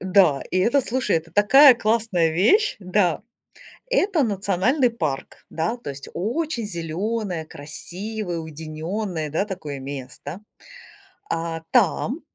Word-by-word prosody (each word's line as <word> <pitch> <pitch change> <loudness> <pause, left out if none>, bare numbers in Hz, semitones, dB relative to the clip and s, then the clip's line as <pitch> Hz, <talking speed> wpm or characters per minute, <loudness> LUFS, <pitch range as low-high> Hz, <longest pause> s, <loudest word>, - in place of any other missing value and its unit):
Да, 185 -7 +4
и 185 - +1
это, 240 +8 +3
слушай, 245 -6 0
это 165 +1 -5
такая 260 +7 +8
классная 215 -7 +1
вещь. 300 - +3
Да, 185 -3 +1 0.7
это 390 - +2
национальный 210 - +1
парк. 155 -12 -4
Да, 165 +8 -1
то 235 - -8
есть 140 0 -8
очень 240 - -2
зелёное 180 0 -3
красивое 175 +6 -6
уединённое, 160 +2 -4
да, 160 +6 0
такое 155 -9 -6
место. 140 +4 -7 0.9
А, 165 0 -2
там, 245 - +2
185 Hz, 115 wpm, -23 LUFS, 160-230 Hz, 0.9 s, такая